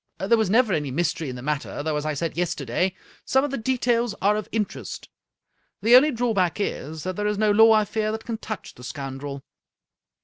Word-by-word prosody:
There 195 +5 +3
was 220 -4 +1
never 225 -1 +3
any 150 -4 -1
mystery 160 +1 -1
in 125 - -5
the 125 - -8
matter, 145 0 -3
though, 155 0 -1
as 150 +1 -2
I 155 - -1
said 165 +3 -3
yesterday, 175 +1 -1 0.3
some 265 0 +2
of 290 - -2
the 275 - -2
details 240 -2 0
are 205 +2 +3
of 215 -1 -4
in 220 -2 +1
terest. - - -9 0.7
The 235 +3 +7
only 280 +5 +7
drawback 225 - 0
is 155 -6 -3
that 185 0 -3
there 210 +2 -1
is 210 -1 0
no 215 0 +3
law, 225 +2 +7
I 215 -1 +4
fear, 215 +1 -1
that 220 0 -5
can 225 -2 -4
touch 215 -3 -7
the 125 - -14
scoundrel." 135 0 -6
200 Hz, 215 wpm, -24 LUFS, 150-225 Hz, 0.7 s, The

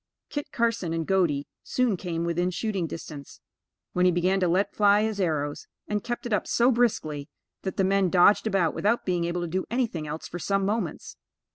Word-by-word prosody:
Kit 290 -1 -4
Carson 230 -7 0
and 165 -1 -1
Godey 165 -7 +1 0.2
soon 250 -5 +1
came 170 -2 -3
within 175 +1 0
shooting 190 -2 -2
distance, 150 -3 -9 0.5
when 180 - +2
he 180 - +5
began 180 +3 +2
to 180 - +2
let 185 +4 +1
fly 205 0 +4
his 215 -2 -1
arrows, 145 -4 -1 0.2
and 210 -1 -2
kept 240 0 -4
it 240 - -2
up 205 - 0
so 240 +2 +3
briskly, 155 - 0 0.3
that 190 - -4
the 195 - +3
men 195 -1 +3
dodged 190 +5 +5
about, 190 -6 +2
without 230 +4 +1
being 175 -2 0
able 175 +1 -2
to 175 - -2
do 185 +3 -2
anything 225 -11 -1
else 155 +2 -5
for 175 - -6
some 195 +4 0
moments. 205 -5 -3
185 Hz, 200 wpm, -26 LUFS, 170-210 Hz, 0.5 s, he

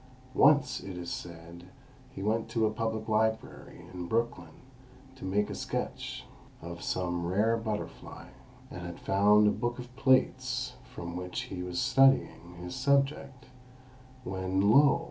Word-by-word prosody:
Once, 145 +1 +4
it 95 -2 -8
is 85 -1 -5
said, 85 0 -8 0.4
he 95 - -8
went 110 +2 0
to 115 -1 +1
a 110 - +1
public 110 0 -3
library 110 0 -1
in 90 -1 -5
Brooklyn 110 -7 -2 0.5
to 130 - -13
make 100 +2 +1
a - - -5
sketch - - -4 0.3
of 85 0 -8
some 90 -2 -2
rare 105 +6 +2
butterfly, 110 -2 -6 0.4
and - - -7
had 85 -1 -7
found 105 +2 +4
a - - +4
book 120 +2 -2
of 125 0 -10
plates 130 -1 +2 0.2
from 85 0 -7
which 90 0 -4
he 90 -2 -6
was 90 -1 -3
studying 135 -10 +3
his 90 0 -7
subject, 135 -1 0 0.8
when, 95 0 +1
lo! 140 +5 +6
105 Hz, 145 wpm, -30 LUFS, 90-120 Hz, 0.8 s, lo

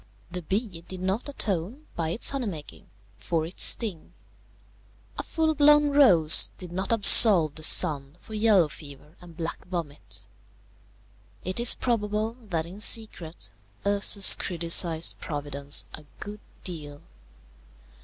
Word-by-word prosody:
The 180 0 -7
bee 190 0 -6
did 185 +2 -11
not 190 +9 -5
atone, 220 - -5
by 165 -2 -4
its 190 +8 +1
honey 270 -4 -5
making, 155 -7 -11 0.3
for 155 +10 -4
its 170 - -6
sting; 200 -9 +1 1.0
a - - -5
full 320 -1 -3
blown 295 0 +2
rose 185 - +5
did 180 -2 -10
not 190 +4 -6
absolve 200 -7 +6
the 155 - -10
sun 145 -2 +3
for 220 - -16
yellow 210 -6 +1
fever 150 +1 -14
and 170 -2 -17
black 165 -1 -8
vomit. 145 - -8 1.2
It 185 +4 -5
is 240 0 +5
probable 215 -1 -4
that 165 -3 -4
in 185 +4 -13
secret 190 -7 -2 0.3
Ursus 200 0 +5
criticized 170 -1 +1
Providence 145 -1 -3
a 155 - -12
good 210 0 -11 0.2
deal. 150 -5 -10
180 Hz, 130 wpm, -23 LUFS, 160-215 Hz, 1.2 s, absolve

